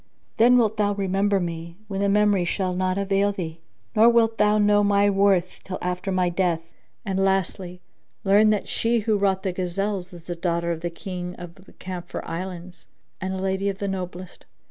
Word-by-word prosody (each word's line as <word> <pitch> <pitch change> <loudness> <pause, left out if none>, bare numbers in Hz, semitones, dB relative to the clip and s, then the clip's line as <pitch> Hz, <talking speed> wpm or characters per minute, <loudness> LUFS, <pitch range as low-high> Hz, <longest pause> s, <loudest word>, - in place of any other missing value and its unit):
Then 245 +2 +6
wilt 220 -2 +2
thou 205 -1 +2
remember 195 +1 +1
me, 170 -1 -5
when 195 -2 -4
the 200 0 +2
memory 205 -2 +3
shall 185 +1 -1
not 185 +1 0
avail 200 0 +1
thee; 165 -4 -6 0.4
nor 220 +2 +7
wilt 230 -1 +3
thou 210 0 +4
know 205 0 +4
my 200 0 +3
worth 195 -2 +2
till 185 -1 -5
after 180 +2 -3
my 185 -1 +2
death. 175 -2 0 0.4
And, 195 -1 -1
lastly, 185 -1 -1 0.4
learn 205 +2 +5
that 210 -1 0
she 230 0 +1
who 215 0 +1
wrought 195 -2 +1
the 190 - 0
gazelles 185 +1 -2
is 175 -2 -12
the 175 - -5
daughter 170 0 -1
of 165 -1 -4
the 175 - -2
King 180 +1 -6
of 175 -1 -9
the 190 +1 -19
Camphor 180 -2 -7
Islands 180 +1 -7 0.3
and 190 +1 -2
a - - -4
lady 190 +1 -1
of 195 - -4
the 200 - -3
noblest." 185 -1 -6
190 Hz, 190 wpm, -24 LUFS, 180-200 Hz, 0.4 s, nor